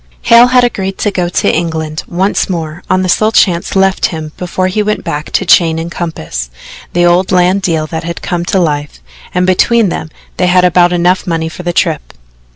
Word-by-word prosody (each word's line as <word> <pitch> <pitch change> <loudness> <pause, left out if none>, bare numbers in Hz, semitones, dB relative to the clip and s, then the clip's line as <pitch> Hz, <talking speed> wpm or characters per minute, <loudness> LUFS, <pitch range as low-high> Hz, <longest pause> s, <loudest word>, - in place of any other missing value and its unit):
Hale 235 +1 +6
had 250 0 +3
agreed 195 -5 -2
to 205 - -1
go 180 -3 -1
to - - 0
England 160 -2 -3
once 190 +4 -1
more 165 -2 -4
on 185 0 +2
the - - -1
sole 215 +4 +2
chance 175 -5 +1
left 190 0 +2
him 160 -3 -6
before 180 +1 -3
he 185 +3 0
went 210 0 -2
back 150 +1 -4
to 195 - +1
chain 165 -2 +4
and 165 +1 -5
compass 80 - -5 0.4
the 175 0 +2
old 175 +2 +2
land 185 +2 +2
deal 165 -5 -1
that 160 +1 -5
had 170 0 -6
come 175 -1 -2
to 195 - 0
life 145 - -2 0.4
and 180 0 +2
between 205 +4 +2
them 160 - -5 0.3
they 180 - +1
had 180 0 +4
about 175 0 +3
enough 180 +2 +1
money 165 -1 -1
for 170 - -9
the 175 -1 -2
trip. 165 -3 -1
175 Hz, 205 wpm, -12 LUFS, 165-190 Hz, 0.4 s, Hale